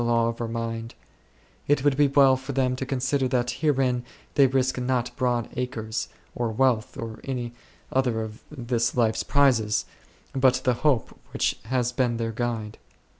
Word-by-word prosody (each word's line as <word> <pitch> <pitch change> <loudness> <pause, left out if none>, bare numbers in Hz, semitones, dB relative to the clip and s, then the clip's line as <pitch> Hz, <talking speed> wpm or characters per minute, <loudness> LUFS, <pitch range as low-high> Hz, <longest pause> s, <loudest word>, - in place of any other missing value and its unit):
law 115 -1 +2
of 115 0 -5
our 115 - -1
mind; 115 0 -4 0.7
it 145 -2 +2
would 145 -2 +3
be 145 +1 +4
well 135 -1 +5
for 130 +2 -6
them 130 -1 +1
to 130 0 -4
consider 135 0 0
that 125 -1 0
herein 130 -5 +2 0.3
they 140 -2 +6
risk 130 0 +1
not 125 -1 -1
broad 125 -3 0
acres, 110 -4 -3 0.3
■or 120 -2 -1
wealth, 120 -4 +1
or 110 -1 -6
any 125 -3 -4 0.4
other 125 -4 +1
of 110 +3 -8
this 120 -4 -1
life's 115 -2 +2
prizes, 125 -7 +2 0.5
but 130 -1 +4
the 125 - +3
hope 145 -6 +2 0.2
which - - 0
has 125 0 0
been 125 -2 0
their 115 -1 -2
guide. 115 -2 -3
125 Hz, 165 wpm, -25 LUFS, 115-130 Hz, 0.7 s, they